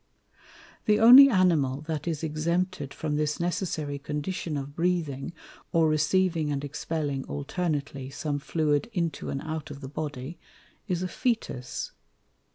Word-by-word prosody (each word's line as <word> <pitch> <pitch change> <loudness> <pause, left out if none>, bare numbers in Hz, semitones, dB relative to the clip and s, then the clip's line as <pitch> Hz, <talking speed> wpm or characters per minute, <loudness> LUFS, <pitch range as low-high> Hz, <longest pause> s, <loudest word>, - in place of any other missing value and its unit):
The 210 0 +4
only 255 +5 +10
Animal 160 - +2
that 155 0 -4
is 160 -2 -2
exempted 160 -1 -1
from 150 -2 -2
this 150 0 0
necessary 170 -5 -2
condition 150 +2 -3
of 140 +1 -6
Breathing, 170 -4 -1 0.4
or 165 -1 +4
receiving 155 +1 +2
and 140 -1 -2
expelling 145 -1 -3
alternately 140 - -3
some 145 +1 -3
Fluid 150 +2 0
into 170 -6 -2
and 135 - -3
out 160 -2 -4
of 145 -1 -8
the 135 - -7
Body, 145 +1 -5 0.5
is 180 -1 -1
a - - 0
Fœtus. 220 - -2
155 Hz, 135 wpm, -27 LUFS, 145-175 Hz, 0.5 s, only